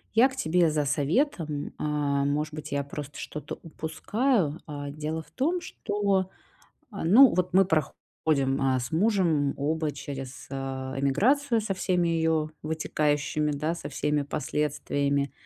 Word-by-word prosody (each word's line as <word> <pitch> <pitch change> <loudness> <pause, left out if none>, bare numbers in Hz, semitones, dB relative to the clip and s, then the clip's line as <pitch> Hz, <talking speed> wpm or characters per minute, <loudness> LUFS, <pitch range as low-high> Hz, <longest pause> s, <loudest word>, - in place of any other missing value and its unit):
Я 245 +4 +7
к 265 - -10
тебе 175 -8 +2
за 150 -1 0
советом. 150 - 0
Э, - - -3
может 145 0 0
быть, 155 0 -7
я 140 0 0
просто 145 0 -7
что-то 150 - -6
упускаю, 165 - -1
э? 145 -2 -5
Дело 155 +2 -3
в - - -19
том, 335 +7 0
что, 200 - -1 0.6
а, 200 -5 -5
ну, 230 +8 +7
вот 180 +1 0
мы 190 +2 +6
проходим, 145 -4 0 0.2
э, - - +1
с 125 +4 -5
мужем 165 -6 +2
оба 155 +2 0
через, 135 -2 -7
э, - - -5
эмиграцию 135 - +1
со 210 -2 -2
всеми 180 -2 +1
её 160 -2 +1
вытекающими, 150 -1 0
да, 155 +3 -1
со 165 -4 -7
всеми 150 +1 0
последствиями. 140 -1 -1
155 Hz, 145 wpm, -27 LUFS, 145-180 Hz, 0.6 s, Я